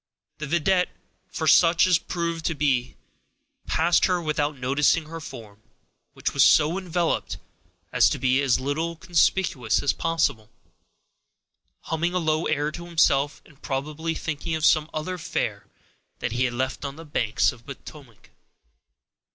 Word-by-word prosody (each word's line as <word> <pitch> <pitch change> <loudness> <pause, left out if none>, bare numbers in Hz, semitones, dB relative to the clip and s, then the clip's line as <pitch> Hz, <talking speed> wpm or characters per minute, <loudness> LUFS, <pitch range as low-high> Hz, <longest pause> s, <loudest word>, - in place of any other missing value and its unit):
The 150 - -4
vidette, 180 +4 +2 0.4
for 180 -3 -4
such 165 +2 +5
it 180 -3 +1
proved 170 -2 -2
to 160 - 0
be, 135 -4 0 0.7
passed 170 +2 +3
her 180 -2 +1
without 150 -3 -1
noticing 145 +5 +2
her 165 +2 -8
form, 110 -6 -11 0.5
which - - -3
was - - +5
so 160 +5 +4
enveloped 175 -2 -1 0.6
as - - +5
to - - -2
be 130 +1 +2
as 135 -3 +2
little 160 +5 -2
conspicuous 170 - +1
as 145 - +2
possible, 160 -10 -1 1.3
humming 170 +3 -2
a - - +3
low 155 -2 0
air 150 0 0
to 170 +2 -8
himself, 145 -4 +2
and 140 -1 -21
probably 155 +4 -3
thinking 160 0 -3
of 160 -1 0
some 155 0 +3
other 180 +4 -4
fair 100 -10 -3 0.5
that 120 - -3
he 125 +3 +1
had 120 -1 -2
left 130 +1 -2
on 140 -1 -5
the 165 +1 -11
banks 115 -7 +1
of 115 - -17
the 140 - -6
Potomac. 135 -8 -15
155 Hz, 150 wpm, -25 LUFS, 135-165 Hz, 1.3 s, such